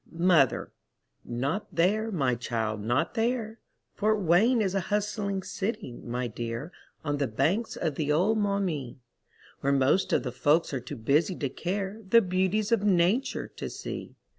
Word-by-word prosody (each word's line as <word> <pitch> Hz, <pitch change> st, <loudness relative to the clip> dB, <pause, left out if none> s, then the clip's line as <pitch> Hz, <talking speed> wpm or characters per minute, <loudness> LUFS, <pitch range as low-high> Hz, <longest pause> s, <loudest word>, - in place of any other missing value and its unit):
Mother: 170 Hz, -6 st, +3 dB, 0.5 s
Not 135 Hz, -, -3 dB
there, 215 Hz, +6 st, +2 dB
my 135 Hz, -9 st, +1 dB
child, 110 Hz, -3 st, -2 dB
not 120 Hz, +10 st, 0 dB
there. 225 Hz, -1 st, -1 dB, 0.3 s
Fort 215 Hz, 0 st, +1 dB
Wayne 205 Hz, +8 st, +4 dB
is 195 Hz, -4 st, +1 dB
a 195 Hz, -, +1 dB
hustling 205 Hz, -2 st, -1 dB
city, 195 Hz, -, -3 dB
my 125 Hz, +1 st, -3 dB
dear, 120 Hz, +6 st, -5 dB, 0.3 s
On 145 Hz, -1 st, 0 dB
the 140 Hz, -1 st, 0 dB
banks 160 Hz, -, 0 dB
of 160 Hz, -4 st, -1 dB
the 150 Hz, +1 st, -1 dB
old 195 Hz, +9 st, +3 dB
Maumee, 190 Hz, -, -1 dB, 0.6 s
Where 140 Hz, -, +1 dB
most 140 Hz, +7 st, +2 dB
of -, -, +2 dB
the 125 Hz, -, -3 dB
folks 145 Hz, +6 st, +2 dB
are 135 Hz, -, 0 dB
too 140 Hz, +3 st, -8 dB
busy 145 Hz, -, +2 dB
to 140 Hz, -5 st, -2 dB
care 195 Hz, +8 st, -3 dB
The 230 Hz, +2 st, +7 dB
beauties 190 Hz, +4 st, 0 dB
of 225 Hz, -3 st, +3 dB
nature 195 Hz, +5 st, +2 dB
to -, -, -4 dB
see. -, -, -7 dB
175 Hz, 160 wpm, -28 LUFS, 135-205 Hz, 0.6 s, The